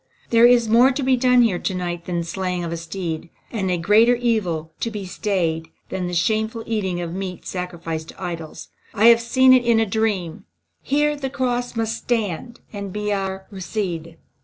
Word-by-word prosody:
There 230 0 +7
is 240 -2 +4
more 235 +4 +6
to 275 +2 -2
be 260 0 +4
done 250 0 +4
here 195 -7 +1
to 190 - -2
night 175 -1 -4
than 175 -1 -2
the 170 - -1
slaying 180 0 -3
of 170 - -4
a 170 - -3
steed, 165 -1 -5 0.2
and 195 -5 -2
a 180 - +1
greater 215 +8 +5
evil 195 -10 -1
to 230 - -1
be 210 -3 -6
stayed 170 -4 -1 0.2
than 180 -1 -3
the 175 - -3
shameful 220 +5 0
eating 195 -6 -1
of 170 -1 -4
meat 185 -1 -5
sacrificed 170 -3 -5
to - - -10
idols. 165 -3 -6 0.3
I 220 +3 +6
have 230 0 +6
seen 260 +2 +5
it 255 -1 +5
in 235 -1 +3
a 225 - +3
dream. 200 -5 -1 0.4
Here 295 +2 +1
the 275 -2 -4
cross 245 -2 -2
must 225 0 -1
stand 230 0 -3
and 200 -2 -5
be 210 +1 -2
our 190 -1 -3
rede." 175 -4 -4
200 Hz, 195 wpm, -22 LUFS, 175-235 Hz, 0.4 s, There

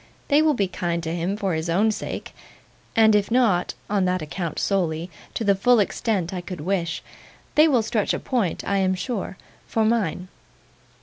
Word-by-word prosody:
They 290 +2 +5
will 310 -2 +3
be 200 -4 +1
kind 170 -2 -2
to 160 0 -3
him 175 +4 -1
for 195 -4 -1
his 160 +1 -2
own 205 +6 +3
sake, - - -5 0.6
and 220 -1 +6
if 205 -1 +2
not 225 -7 +2
(on 200 -2 +1
that 180 -2 0
account 165 +2 -4
solely) 175 -3 -1 0.2
to - - -1
the 200 -2 +4
full 235 +5 +4
extent 195 -3 0
I 180 - -3
could 175 -2 -7
wish, 170 -1 -1 0.5
they 305 +2 +6
will 255 -7 +3
stretch 220 -2 0
a - - 0
point, 230 -10 -1
I 200 - +1
am 190 -1 +2
sure, 195 -2 -4 0.3
for 220 -1 +1
mine. 205 -6 0
195 Hz, 185 wpm, -24 LUFS, 175-220 Hz, 0.6 s, and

